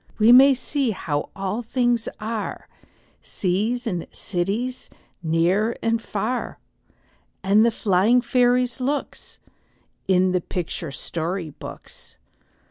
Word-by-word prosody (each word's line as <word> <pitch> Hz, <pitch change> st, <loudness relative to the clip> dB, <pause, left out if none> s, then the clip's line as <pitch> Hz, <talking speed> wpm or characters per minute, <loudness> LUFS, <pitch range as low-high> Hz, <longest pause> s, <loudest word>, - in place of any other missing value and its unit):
We 220 Hz, +2 st, +6 dB
may 265 Hz, +2 st, +8 dB
see 265 Hz, +1 st, -1 dB
how 155 Hz, -8 st, -3 dB
all 195 Hz, +3 st, -3 dB
things 240 Hz, -1 st, 0 dB
are, 220 Hz, 0 st, -4 dB, 0.5 s
Seas 215 Hz, +7 st, -1 dB
and 180 Hz, -7 st, -3 dB
cities, 205 Hz, +8 st, -3 dB, 0.3 s
near 175 Hz, +7 st, +1 dB
and 230 Hz, 0 st, +1 dB
far, 225 Hz, +4 st, -3 dB, 0.9 s
And 200 Hz, +3 st, +4 dB
the 235 Hz, -, +5 dB
flying 215 Hz, +2 st, +3 dB
fairies' 250 Hz, 0 st, +2 dB
looks, 280 Hz, +3 st, -3 dB, 0.7 s
In 185 Hz, -1 st, +3 dB
the 180 Hz, -1 st, +1 dB
picture 170 Hz, -2 st, -4 dB
story 165 Hz, +4 st, -3 dB
books. -, -, -11 dB
215 Hz, 110 wpm, -23 LUFS, 185-245 Hz, 0.9 s, may